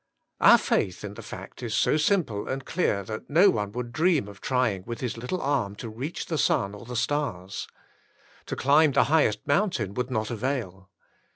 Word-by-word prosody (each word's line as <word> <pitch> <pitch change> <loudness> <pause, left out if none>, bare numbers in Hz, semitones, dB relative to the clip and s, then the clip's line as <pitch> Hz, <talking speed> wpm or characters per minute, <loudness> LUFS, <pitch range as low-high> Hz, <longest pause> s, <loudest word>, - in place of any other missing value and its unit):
Our - - +8
faith 90 +1 -1
in 105 -1 -6
the - - -9
fact - - -9
is - - -3
so - - +3
simple 155 - +1
and 135 0 -4
clear 105 - 0
that 110 +3 -7
no 175 +7 +6
one 105 -2 -2
would 120 0 -4
dream 160 - +2
of 100 -1 -12
trying 125 -8 0
with 120 -1 -5
his 125 -3 -3
little 125 +11 -3
arm 130 - -1
to 115 - -7
reach 130 +10 -5
the 160 -3 -2
sun 100 -5 +1
or 105 +3 -10
the 125 +1 -7
stars. 115 -8 -2 0.8
To - - -3
climb 145 +2 +4
the 140 - +5
highest 110 -10 +2
mountain 145 - +1
would 125 +2 -2
not 110 -3 -2
avail. 110 -6 -3
125 Hz, 190 wpm, -26 LUFS, 105-145 Hz, 0.8 s, Our